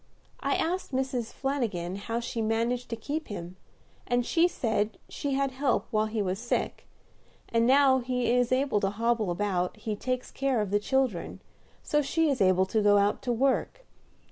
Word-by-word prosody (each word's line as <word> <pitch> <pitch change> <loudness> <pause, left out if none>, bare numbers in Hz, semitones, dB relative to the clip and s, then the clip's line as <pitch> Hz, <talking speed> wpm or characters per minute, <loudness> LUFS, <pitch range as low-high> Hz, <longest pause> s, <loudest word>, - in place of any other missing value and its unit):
I - - 0
asked 350 -3 -2
Mrs. 260 -3 -1
Flanagin 220 -11 -2
how 230 +3 -3
she 235 -1 -3
managed 230 +3 0
to 230 - -2
keep 295 +8 -4
him, 180 -3 -7 0.5
and 245 0 +1
she 335 +5 +3
said 220 -9 -1
she 280 -2 -2
had 275 0 +1
help 260 -1 0
while 215 -1 +2
he 215 -1 -1
was 190 +1 -2
sick, 240 +1 -2 0.6
and 230 0 +2
now 265 0 +5
he 250 -1 0
is 245 -1 +2
able 260 -4 +2
to 195 - +1
hobble 225 0 0
about, 180 +1 -1
he 215 0 -3
takes 255 +4 -3
care 270 -3 0
of 210 -3 -2
the 205 - +3
children, 255 -4 -1 0.4
so 295 - +2
she 320 +2 +1
is 260 - -1
able 185 0 +4
to 215 +3 0
go 205 0 +5
out 200 +1 +2
to 245 - -1
work. 270 - 0
235 Hz, 180 wpm, -28 LUFS, 205-265 Hz, 0.6 s, now